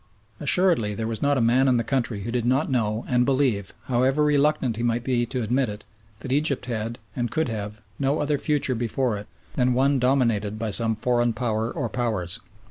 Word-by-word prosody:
Assuredly 150 - +2
there 110 - -3
was 115 -1 -3
not 145 -1 +2
a - - +2
man 125 +4 +3
in 125 -2 +3
the 115 - 0
country 120 -4 -1
who 115 - -4
did 120 -1 -1
not 130 +5 +1
know 110 -2 0
and 125 -1 +2
believe, 125 -7 +1
however 130 +4 +2
reluctant 145 -4 +2
he - - -3
might 120 0 0
be 120 -2 0
to 125 0 -3
admit 125 +2 +1
it, 105 0 -8 0.4
that 130 - -6
Egypt 140 -2 +1
had, 115 -1 -3 0.2
and 120 -1 -1
could 155 +3 -1
have, 105 -1 -5 0.2
no 140 +2 +1
other 145 -1 0
future 145 -3 0
before 120 0 -1
it 105 - -10 0.3
than 125 -1 +1
one 135 +1 +3
dominated 115 -5 +1
by 110 -1 -3
some 110 +2 +3
foreign 120 +1 +1
Power 110 0 -1
or - - -2
Powers. 110 -5 -1
120 Hz, 205 wpm, -24 LUFS, 110-135 Hz, 0.4 s, man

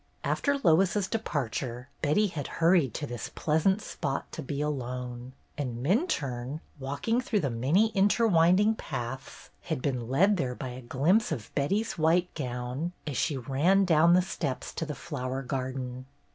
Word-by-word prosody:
After 285 -1 +1
Lois's 190 - +3
departure 130 - -3
Betty 155 +9 +3
had 155 -8 -4
hurried 165 - +3
to 150 - -2
this 120 -6 -5
pleasant 190 +7 +2
spot 135 -8 -4
to - - -5
be 140 0 -4
alone, 125 -3 -4 0.3
and 125 -4 -3
Minturne, 145 - 0 0.2
walking 145 - -1
through 220 -4 0
the 140 -5 -1
many 145 - +3
interwinding 200 -1 +4
paths, 130 -1 -6
had - - -3
been 125 -3 -2
led 195 +10 +4
there 125 -6 -1
by 130 - -5
a 125 +1 -7
glimpse 155 - +2
of 115 -8 -5
Betty's 195 +7 0
white 170 +3 +3
gown 125 +4 -3
as 145 -3 -4
she 145 +1 0
ran 150 +10 +2
down 170 0 +5
the 180 - +4
steps 145 -7 -4
to 165 - -3
the 150 - -4
flower 135 -5 -4
garden. 130 -1 -4
145 Hz, 155 wpm, -29 LUFS, 130-180 Hz, 0.3 s, down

